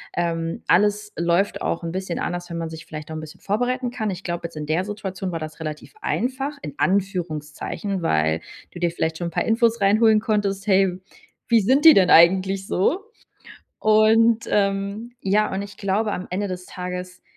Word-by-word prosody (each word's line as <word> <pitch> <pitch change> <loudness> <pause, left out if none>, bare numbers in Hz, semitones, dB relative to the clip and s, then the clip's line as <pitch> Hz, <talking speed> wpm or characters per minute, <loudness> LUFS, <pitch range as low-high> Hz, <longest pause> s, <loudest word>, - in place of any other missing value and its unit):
ähm, 165 -1 -2
alles 210 +2 +2
läuft 170 +4 +1
auch 170 - -2
'n 165 - -3
bisschen 185 -1 -4
anders, 175 0 -4
wenn 170 - -4
man 165 -1 -3
sich 160 +1 -9
vielleicht 155 0 -8
auch - - -5
'n - - -4
bisschen 155 -1 -11
vorbereiten 245 +4 -1
kann. 220 -4 -2
Ich 185 +1 -7
glaube, 170 -1 -3
jetzt 165 - -14
in 150 -1 -5
der 160 +4 +1
Situation 195 -3 -5
war 165 - -3
das 155 0 -8
relativ 155 -1 -7
einfach 270 +4 -2
in - - -7
Anführungszeichen, 185 0 -2
weil 80 - +1 0.3
du - - -9
dir 175 -1 +1
vielleicht 160 -1 -2
schon 175 -1 -2
'n - - -15
paar - - -1
Infos 230 0 +2
reinholen 215 +2 +5
konntest: 205 -2 -1
„Hey, 190 -2 +3 0.5
wie 230 -2 +4
sind 260 +8 +3
die 320 - +10
denn 185 -2 +5
eigentlich 190 +3 +5
so?“ 350 - 0 0.8
Und, 220 +1 +4
ähm, 200 +3 0
ja, 210 +1 +1
und 190 +1 -2
ich 200 0 -10
glaube 205 +2 0
am 180 - -5
Ende 195 +3 -1
des 180 -1 -6
Tages 180 0 -6
190 Hz, 190 wpm, -23 LUFS, 170-215 Hz, 0.8 s, die